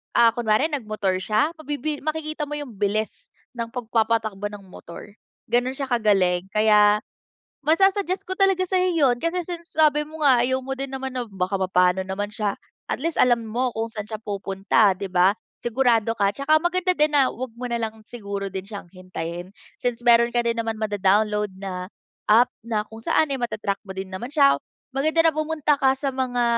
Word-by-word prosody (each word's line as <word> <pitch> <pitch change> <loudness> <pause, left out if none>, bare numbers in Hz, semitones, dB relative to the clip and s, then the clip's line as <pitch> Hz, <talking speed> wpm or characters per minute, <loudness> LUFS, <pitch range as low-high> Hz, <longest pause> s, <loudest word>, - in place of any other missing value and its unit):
ah, 230 -1 +6
kunwari 235 +4 +2
nag-motor 215 - -2
siya, 215 +9 +1
mabibi 295 -1 -4
makikita 310 0 -3
mo - - -12
'yung 255 -7 -8
bilis 210 +2 -2 0.2
ng 230 -1 -4
pagpapatakbo 220 -4 -1
ng 200 -2 -11
motor. 180 +3 -12 0.3
Ganun 245 +3 +1
siya 275 -1 -3
kagaling, 195 -6 +1
kaya 210 0 +5 0.6
masu-suggest 375 +5 +2
ko 375 - -3
talaga 385 -1 +2
sa'yo 370 0 +1
'yun. 260 -5 +3
Kasi 335 +1 -1
since 340 -2 -8
sabi 300 -1 +4
mo 305 0 -4
nga 255 -4 +6
ayaw 260 +1 0
mo 270 - -2
din 270 0 -4
naman 265 0 -5
na 245 -3 -4
baka 190 0 -2
mapano 180 0 +3
naman 205 +2 -4
siya. 205 -2 -2 0.3
At - - -2
least, 330 +3 -2
alam 235 -2 +3
mo 245 +3 0
kung 225 0 -3
saan 210 -2 -5
siya 215 - -4
pupunta, 200 0 +1
'di 200 0 -4
ba? 180 +1 +4 0.3
Sigurado 235 -2 +2
ka 200 -3 +1
'tsaka 310 +3 +3
maganda 365 +2 +1
din 300 -3 +2
na 270 -3 +4
huwag 250 -1 -7
mo 245 - -9
na 235 - 0
lang 220 -1 -5
siguro 200 -3 -6
din 190 0 -6
siyang 200 -5 -9
hintayin. 180 -1 -6 0.3
Since 240 -1 -2
meron 235 0 +5
ka 240 - +3
din 235 0 0
naman 225 -1 -2
mado-download 210 -1 +1
na 185 -1 -6 0.4
app 230 +4 +5 0.2
na 215 -2 0
kung 225 - -9
saan 290 +5 +1
ay 270 - -2
mata-track 210 -4 -2
mo 190 - -7
din 190 0 -6
naman 190 +6 -5
siya. 280 -2 +4 0.3
Maganda 310 +5 +2
na - - -17
pumunta 305 -2 0
ka 265 0 +3
sa 275 0 -2
mga 255 -2 -1
230 Hz, 185 wpm, -23 LUFS, 205-280 Hz, 0.6 s, ah